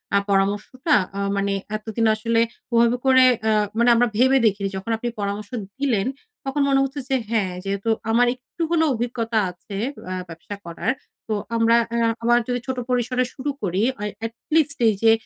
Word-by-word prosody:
আ - - +6
পরামর্শটা 205 - +1 0.2
অ্যা 200 - -3 0.2
মানে 200 0 0 0.2
এতদিন 220 +1 -2
আসলে 230 +1 +1 0.3
ওভাবে 235 +1 +4
করে 260 -1 +6 0.2
অ্যা 220 0 +2 0.2
মানে 235 +1 +4
আমরা 245 +1 +4
ভেবে 260 +3 +5
দেখিনি। 200 -2 +2
যখন 195 +4 -4
আপনি 240 - -4
পরামর্শ 200 +1 -3 0.3
দিলেন 240 -7 +1 0.4
তখন 270 +2 -1
মনে 270 0 +4
হচ্ছে 275 +2 -3
যে, 270 - +2
হ্যাঁ, 215 -5 +1
যেহেতু 200 +2 -2 0.2
আমার 240 +2 +4
একটু 250 +7 -12
হলেও 320 -2 +3
অভিজ্ঞতা 230 -1 -1
আছে 180 +3 -10 0.3
অ্যা 185 0 -4
ব্যবসা 165 +5 -8
করার। 170 +8 -2 0.4
তো 220 - -1 0.2
আমরা 230 0 +4 0.2
অ্যা 235 0 +2 0.2
আবার 240 +1 +4
যদি 245 0 -1
ছোট 260 -1 -2
পরিসরে 250 0 +1
শুরু 285 +2 -3
করি, 190 +1 0 0.2
এ - - 0 0.2
এটলিস্ট 285 +6 0
এই 215 - +3
যে 225 - +7
230 Hz, 175 wpm, -23 LUFS, 205-255 Hz, 0.4 s, যে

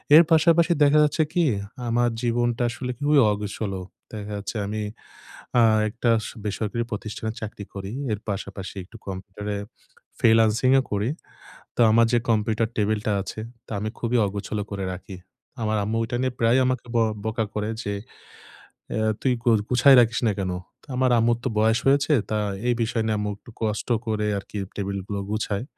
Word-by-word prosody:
এর 165 - +10
পাশাপাশি 165 +2 +5
দেখা 150 +1 +5
যাচ্ছে 150 +1 +2
কি? 175 - +3 0.5
আমার 120 +1 +2
জীবনটা 120 0 +1
আসলে 125 +1 -4
খুবই 145 0 +4
অগোছলো। 100 -1 -3 0.3
দেখা 105 -1 -6
যাচ্ছে 100 +3 -5
আমি 105 +1 -3 0.8
আ - - +6 0.3
একটা 120 +2 -1 0.2
স - - -6
বেসরকারি 110 +3 -2
প্রতিষ্ঠানের 110 +1 -4
চাকরি 105 -2 -6
করি। 100 0 -6 0.2
এর 105 - -3
পাশাপাশি 100 0 -5
একটু 110 +5 -13
কম্পিউটারে 100 +2 -5 0.6
ফ্রিল্যান্সিংও 115 +4 +4
করি। 105 +4 0 0.7
তো - - 0
আমার 115 +1 +5
যে 120 - +5
কম্পিউটার 110 0 +1
টেবিলটা 105 0 0
আছে, 110 - -7 0.3
তা - - -19
আমি 110 +1 -2
খুবই 120 +1 +1
অগোছল 100 +1 -4
করে 100 -1 -3
রাখি। 95 +1 -8 0.5
আমার 110 0 +1
আম্মু 110 +2 -1
ঐটা 120 +2 -3
নিয়ে 130 -1 0
প্রায়ই 115 +3 +4
আমাকে 130 -1 -1
ব্য - - +3 0.3
বকা 110 0 0
করে 105 0 -1
যে, 100 - -3 1.0
"আ - - -1 0.2
তুই 130 -2 +2
গু 120 - +3 0.2
গুছায় 130 +2 +7
রাখিস 115 -1 +1
না - - +3
কেন?" 95 -1 -1 0.3
ত - - -20
আমার 130 0 +3
আম্মুর 115 +1 +3
তো - - 0
বয়স 110 +2 +3
হয়েছে, 145 +2 +4 0.2
তা 110 - 0 0.3
এই 120 - +4
বিষয় 115 0 -1
নিয়ে 110 -1 +1
আম্মু 105 - -1
একটু 120 - -15
কষ্ট 110 -1 -1 0.2
করে 110 -2 -1
আরকি 100 +1 -7 0.2
টেবিলগুলো 100 0 -3
গুছায়। 105 0 -1
110 Hz, 170 wpm, -24 LUFS, 105-120 Hz, 1.0 s, এর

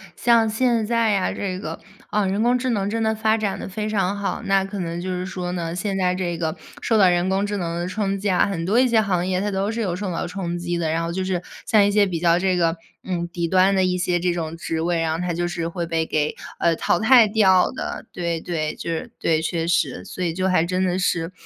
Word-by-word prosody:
像 230 -2 +3
现 235 0 +1
在 225 -1 +2
啊 185 - 0
这 185 -2 -3
个， - - -6 0.3
啊 210 -1 +1
人 195 +2 0
工 245 +2 +3
智 255 0 -1
能 200 -3 0
真 225 +1 -1
的 220 0 +2
发 220 0 +1
展 210 -3 -2
得 - - -6
非 210 +2 -3
常 200 -2 0
好。 200 -1 -3
那 195 -1 +2
可 195 +1 -6
能 170 -1 -3
就 185 +1 -4
是 180 0 -2
说 180 -1 -4
呢， 170 -2 -3
现 195 +2 -2
在 180 -1 +1
这 175 -2 -3
个 160 -2 -2 0.2
受 225 - +2
到 195 -3 +6
人 175 +1 +2
工 195 +1 +1
智 205 0 -2
能 170 -3 -3
的 175 - -2
冲 195 +1 -1
击 200 +1 -3
啊， 180 - +3
很 175 -4 -3
多 210 +7 +3
一 255 - +5
些 230 -2 +3
行 185 -4 0
业 185 -1 0
它 205 +2 -1
都 195 +2 -1
是 230 - -4
有 190 -6 -1
受 190 0 -3
到 165 - -2
冲 175 -1 -4
击 175 0 -3
的， 165 -2 0
然 165 +1 0
后 165 - -2
就 185 +2 -2
是 185 -1 -1 0.3
像 210 -2 +5
一 205 - +2
些 205 0 +4
比 175 -3 -3
较 170 0 +3
这 185 -1 +1
个 165 -1 +2 0.3
嗯 175 -2 -2
底 170 0 -3
端 190 +2 +4
的 190 - +3
一 180 0 +1
些 180 -1 0
这 175 0 0
种 165 -1 -4
职 165 -1 -3
位， 170 0 0
然 165 -1 0
后 160 - -3
它 180 0 -1
就 175 +1 -1
是 170 -1 -3
会 170 0 -3
被 165 -1 0
给 150 -1 0 0.2
呃 170 -1 +2
淘 175 - +1
汰 230 +1 +6
掉 195 -4 +4
的， - - -5
对 170 -2 -2
对， 155 -3 -2
就 - - -6
是 165 - -4
对， 160 -1 +2
确 165 +1 -2
实。 175 0 0
所 185 - -6
以 170 -2 0
就 185 +2 0
还 175 -3 +3
真 185 +2 0
的 180 -1 0
是 170 -2 0
185 Hz, 290 characters per minute, -22 LUFS, 170-205 Hz, 0.3 s, 到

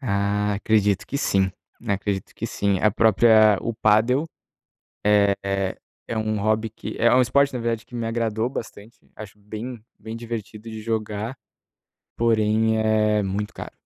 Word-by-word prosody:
Ah, 105 -3 0
acredito 105 -1 +1
que 140 - -3
sim, 95 -8 +1 0.4
acredito 100 -1 -2
que - - -4
sim, 100 -1 0
a 105 - +4
própria 110 -1 +5
o 115 - -2
padel, 110 +8 +3 0.8
é 100 -1 +4
é 100 -1 -1 0.3
é 115 - -3
um 110 -1 -1
hobby 110 +2 +1
que 110 - -8
é 120 +1 +4
um 130 - +6
esporte 140 +3 +2
na - - -2
verdade 115 -1 -2
que - - -15
me 115 -1 -3
agradou 115 0 -1
bastante. 110 -3 -8 0.2
Acho 105 -1 -10
bem 110 +3 -7 0.2
bem 110 +1 -7
divertido 115 -1 -7
de 110 0 -7
jogar. 110 +1 -3 0.8
Porém 110 -1 +2
é 105 -1 +2
muito 100 +2 -3
caro, - - -8
110 Hz, 155 wpm, -23 LUFS, 105-115 Hz, 0.8 s, um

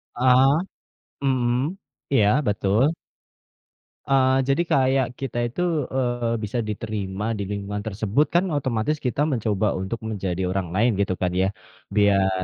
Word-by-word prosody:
Heeh. 130 +2 +5 0.7
Mhm. 130 +5 +1 0.3
Iya, 110 -7 +4 0.2
betul. 105 +5 +2 1.2
Eee, 130 -1 +4
jadi 140 +4 +2
kayak 130 -1 +3
kita 135 -3 -4
itu, 120 +9 -5 0.3
eee, 120 -3 0
bisa 105 +4 -2
diterima 105 -2 -4
di 100 - -3
lingkungan 100 0 -4
tersebut 110 +7 +1
kan 175 - +5
otomatis 130 +2 -1
kita 125 +3 0
mencoba 110 -4 0
untuk 95 +5 -4
menjadi 95 -4 -3
orang 95 -1 -1
lain, 115 +5 +3
gitu 95 -2 0
kan, 90 -1 +1
ya, 95 - +3 0.5
biar 95 -2 +3
115 Hz, 130 wpm, -23 LUFS, 100-130 Hz, 1.2 s, Heeh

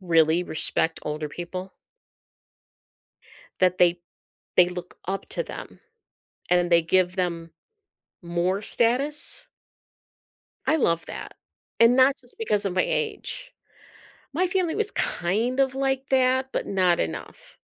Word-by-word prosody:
really 165 -1 +3
respect 160 0 -1
older 150 0 -3
people 180 +4 -6 1.9
that 185 0 +4
they 175 0 +4 0.6
they 180 0 +6
look 180 0 -8
up 195 +1 -3
to - - -2
them - - -9 0.7
and 180 - +5
then 175 0 +1
they 170 0 +5
give 180 +2 +2
them 170 -3 -2 0.7
more 175 +3 -1
status. 260 +8 0 1.2
I 310 - +4
love 170 - +1
that - - -7 0.5
and 230 +2 +6
not 265 +1 +5
just 245 - -24
because 210 -2 0
of 190 - -1
my 185 - +2
age. 485 +3 -3 0.8
My 365 +5 +1
family 360 -3 0
was 425 -1 0
kind 225 +9 0
of 265 -1 +2
like 270 0 -1
that, 260 0 +2
but - - -2
not 185 -3 +2
enough. 80 -1 -6
190 Hz, 130 wpm, -25 LUFS, 175-265 Hz, 1.9 s, they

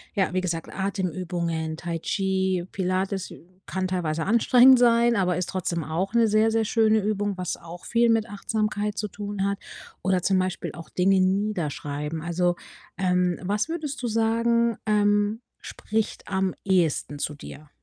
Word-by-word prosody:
ja, 190 -2 +1
wie 185 - +1
gesagt, 170 -3 -3
Atemübungen, 175 -4 -2
Tai 170 -1 -4
Chi, 190 -1 0
Pilates 190 0 -2 0.4
kann 190 0 -2
teilweise 165 -4 -1
anstrengend 245 +4 +6
sein, 235 -1 +4
aber 180 -3 +1
ist 180 - -2
trotzdem 170 -3 -2
auch 180 +6 -2
'ne 230 -1 +5
sehr, 215 +1 +3
sehr 225 -1 +1
schöne 220 -1 +3
Übung, 205 -1 -1
was 180 -2 -2
auch 170 +1 -11
viel 235 0 +3
mit 225 0 +2
Achtsamkeit 210 0 -2
zu 210 - -1
tun 205 -1 -4
hat. 200 0 -2 0.4
Oder 185 -1 +1
zum 190 -1 +3
Beispiel 185 0 -2
auch 165 -1 -10
Dinge 190 +1 +3
niederschreiben. 160 -6 -1
Also, 175 +1 +1 0.4
ähm, 180 -1 +1
was 205 - -1
würdest 305 -5 -4
du - - 0
sagen, 230 +1 +2
ähm, 205 +1 +2 0.2
spricht 220 0 -3
am 190 -1 -1
ehesten 165 -6 +1
zu 150 - -2
dir? 150 +1 -11
190 Hz, 155 wpm, -25 LUFS, 175-215 Hz, 0.4 s, anstrengend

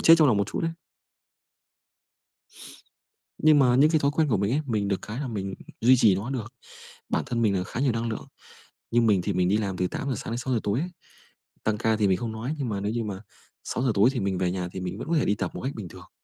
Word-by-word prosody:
chết 165 - +8
trong 155 -4 +6
lòng 110 - +3
một 100 0 +1
chút - - -4
ấy. 165 0 0 2.7
Nhưng 155 -1 +5
mà 125 -3 +4
những 150 +4 +5
cái 160 - +3
thói 140 0 +2
quen 155 0 +1
của 110 - +2
mình 100 +4 0
ấy, 150 - +2
mình 105 -4 0
được 100 - -1
cái 110 +6 -5
là 135 - -3
mình 100 -3 -4 0.3
duy 125 +3 +6
trì 110 -5 +5
nó 105 +8 -3
được, 120 -2 -4 0.6
bản - - 0
thân 115 -1 -1
mình 105 -3 +3
là 90 - -2
khá 120 - -5
nhiều 135 -4 +2
năng 115 +1 -2
lượng, 110 - -5 0.7
như 120 - +4
mình 105 -5 +3
thì - - -2
mình 90 0 +2
đi 105 - +3
làm 100 -4 -2
từ 90 - +1
8:00 135 +7 -3
sáng - - -6
đến - - -2
6:00 125 -2 -1
tối 105 +4 0
ấy, 175 +4 -2 0.8
tăng 105 -1 0
ca 110 -1 +2
thì 105 -2 +2
mình 95 - +3
không 115 +1 -4
nói, 115 +7 -4
nhưng 135 -4 -2
mà 100 -3 -2
nếu 105 +2 -2
như 115 -1 -2
mà 100 -2 -5 0.4
6:00 125 +1 0
tối 105 +6 +5
thì 125 - -2
mình 95 -2 -1
về 90 -1 +1
nhà 90 -1 -3
thì 95 - -5
mình 90 +3 -4
vẫn - - -6
có 170 - +1
thể - - +2
đi 105 - +2
tập 95 -3 -3
một - - -6
cách 135 +2 -3
bình 100 -6 -6
thường. - - -13
110 Hz, 270 wpm, -26 LUFS, 100-130 Hz, 2.7 s, chết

